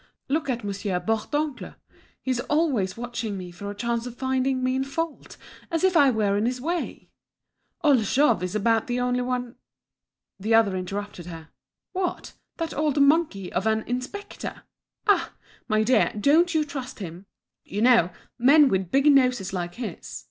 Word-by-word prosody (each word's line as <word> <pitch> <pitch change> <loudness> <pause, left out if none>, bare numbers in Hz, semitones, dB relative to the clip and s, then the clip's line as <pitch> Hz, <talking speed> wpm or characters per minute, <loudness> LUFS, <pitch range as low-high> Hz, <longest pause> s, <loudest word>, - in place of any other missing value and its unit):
"Look 305 +1 0
at 240 -3 -1
Monsieur 200 -2 -2
Bourdoncle, 250 +9 -2 0.5
he's 255 -2 0
always 260 - 0
watching 235 -3 -4
me 180 -1 -7
for 200 +4 -7
a 205 - -6
chance 235 +3 -2
of 245 - -8
finding 260 0 0
me 255 0 +1
in 265 - +1
fault, 315 +3 -5 0.3
as 330 0 -1
if 375 -1 +3
I 285 -4 +6
were 210 -4 +1
in 210 +3 +1
his 250 0 -2
way. 335 +6 -4 0.7
Old 285 -5 +5
Jouve 235 - +2
is 180 +2 -3
about 225 +2 +2
the 245 0 -1
only 250 0 +1
one—" 250 -1 -3 0.8
The 220 +4 +2
other 215 -4 +4
interrupted 185 -1 -5
her. 165 -2 -9 0.4
"What, 370 -1 -3 0.2
that 330 -1 -3
old 295 -1 0
monkey 280 - +2
of 190 +5 0
an 220 0 +1
inspector! 255 +12 -5 0.4
Ah! 360 -6 +2 0.3
my 215 -1 +2
dear, 250 +4 +3
don't 325 - +4
you 310 -1 +2
trust 270 -3 -6
him. 180 -1 -8 0.4
You 205 +3 -3
know, 235 -8 +5 0.3
men 280 +3 +6
with 190 -4 0
big 275 +6 +2
noses 250 -8 +2
like 175 -1 -3
his! 235 -2 -6
245 Hz, 165 wpm, -25 LUFS, 205-280 Hz, 0.8 s, I